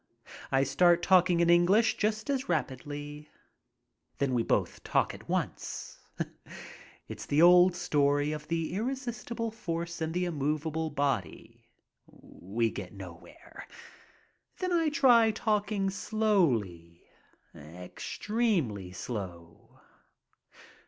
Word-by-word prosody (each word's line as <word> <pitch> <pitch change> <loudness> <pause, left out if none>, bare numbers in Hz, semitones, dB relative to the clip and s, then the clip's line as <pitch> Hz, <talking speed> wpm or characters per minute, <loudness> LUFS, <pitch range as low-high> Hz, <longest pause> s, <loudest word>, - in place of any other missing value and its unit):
I 135 0 +3
start 170 +5 +3
talking 180 -2 +4
in 170 - +3
English 190 +6 +4
just 215 0 -1
as 265 -5 -2
rapidly. 145 0 -4 0.9
Then 140 -2 0
we 120 - +2
both - - -1
talk - - +1
at - - -13
once. - - -4 1.1
It's - - -8
the 150 +3 +3
old 180 +1 +7
story 145 -4 +1
of 150 0 -6
the 165 +1 -2
irresistible 235 0 -3
force 170 -5 -5
and 160 0 -1
the 180 +2 -1
immovable 155 0 -2
body. 140 - -3 0.4
We 110 +5 -4
get - - -7
nowhere. - - -12 0.9
Then 365 -1 -2
I 330 -2 +2
try 245 -6 +5
talking 210 -2 0
slowly, 125 - 0 0.5
extremely 105 - -3
slow. 90 -5 -8
170 Hz, 105 wpm, -29 LUFS, 135-210 Hz, 1.1 s, old